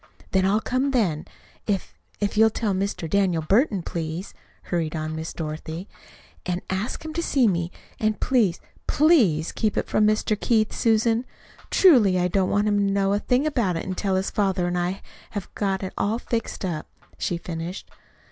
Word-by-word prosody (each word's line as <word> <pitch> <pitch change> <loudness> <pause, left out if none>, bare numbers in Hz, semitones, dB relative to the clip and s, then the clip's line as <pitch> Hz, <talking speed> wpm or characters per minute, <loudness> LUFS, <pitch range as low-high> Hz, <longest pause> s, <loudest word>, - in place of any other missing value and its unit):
"Then 190 0 +3
I'll 210 +3 +2
come 255 +4 0
then. 195 - 0 0.4
If 200 -3 -1 0.3
if 205 0 -1
you'll 220 +1 +6
tell 220 -2 -1
Mr. 190 -3 -2
Daniel 180 -2 +1
Burton, 200 - +2
please," 165 +3 -4 0.3
hurried 165 -3 -2
on 155 0 -3
Miss 160 +1 -4
Dorothy, 160 +3 -5 0.6
"and 180 -1 -2
ask 205 +11 -3
him 315 - -5
to 335 - -1
see 270 -7 +3
me. 170 -3 0 0.3
And 215 -1 0
please, 220 -10 +2 0.3
PLEASE 230 - +4
keep 215 -2 -1
it - - 0
from 210 - +3
Mr. 215 0 +2
Keith, 220 -2 +2
Susan. 225 +1 +2 0.5
Truly, 235 - +6
I 180 0 +1
don't 185 0 +1
want 205 +1 +2
him 205 -1 +2
to 200 -1 +2
know 195 0 +2
a 205 - +2
thing 250 +6 +1
about 235 - +1
it 185 +3 -4
till 195 0 0
his 190 +1 -1
father 195 -4 +1
and 175 0 -1
I 175 0 +1
have 190 +2 -6 0.3
have 205 -4 -6
got 195 -2 -1
it 190 - -4
all 215 +3 +1
fixed 230 -4 -3
up," 160 -4 -3 0.3
she 175 - -1
finished. 170 +2 -6
195 Hz, 185 wpm, -24 LUFS, 175-220 Hz, 0.6 s, you'll